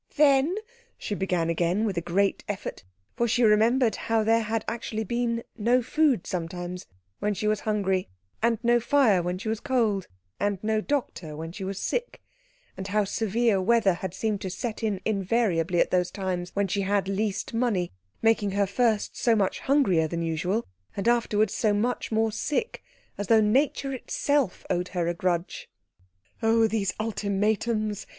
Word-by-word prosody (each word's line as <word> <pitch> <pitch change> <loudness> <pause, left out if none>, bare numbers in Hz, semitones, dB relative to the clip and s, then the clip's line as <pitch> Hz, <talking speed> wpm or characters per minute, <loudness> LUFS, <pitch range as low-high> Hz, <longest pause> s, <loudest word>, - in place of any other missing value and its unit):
"Then 290 +3 +4 0.2
" 475 - -33
she - - -4
began 180 -4 0
again, 175 +6 +1
with 200 -4 -1
a 170 - -1
great 190 +4 0
effort; 205 - -5 0.3
for 235 - +1
she 240 +2 +2
remembered 225 +2 +4
how 225 -1 0
there 225 +1 +3
had 220 0 -2
actually 225 -1 -3
been 235 +1 -1 0.2
no 240 +4 +3
food 275 - +2
sometimes 175 +1 -5 0.3
when 210 0 0
she 215 - -3
was 215 -1 +2
hungry, 195 -3 0 0.3
and 230 0 +2
no 240 0 +4
fire 235 -7 +3
when 180 +1 -2
she 210 +4 -7
was 220 0 -1
cold, 225 -8 0 0.3
and 205 -1 0
no 215 0 +1
doctor 215 - -3
when 165 +2 -6
she 195 +3 -7
was 195 +1 -4
sick, 485 0 -2 0.6
and 190 0 -6
how 210 +1 +2
severe 220 0 +1
weather 210 -1 +3
had 185 +1 -5
seemed 215 -2 -1
to 190 - -3
set 210 +4 -4
in 210 -4 -1
invariably 190 -5 +1
at - - +2
those 180 -1 +2
times 185 -2 -3
when 200 0 +1
she 200 +2 -1
had 195 0 0
least 200 +2 -2
money, 225 -7 0 0.3
making 225 -2 +3
her 200 0 +2
first 215 +1 0
so 235 -2 +2
much 200 -3 0
hungrier 220 - +2
than 170 +1 -3
usual, 175 +7 -1 0.3
and 200 - -1
afterwards 220 -3 +2
so 215 -2 +1
much 235 +4 -1
more 220 0 +2
sick, 300 - -2 0.4
as 205 - -3
though 225 -1 +6
nature 270 +5 +1
itself 275 -2 -1
owed 180 +1 -1
her 175 -2 -2
a 170 - +1
grudge. 175 0 -2 0.7
"Oh, 225 0 +4
these 210 -4 0
ultimatums!" 215 0 -1
210 Hz, 170 wpm, -26 LUFS, 190-230 Hz, 0.7 s, though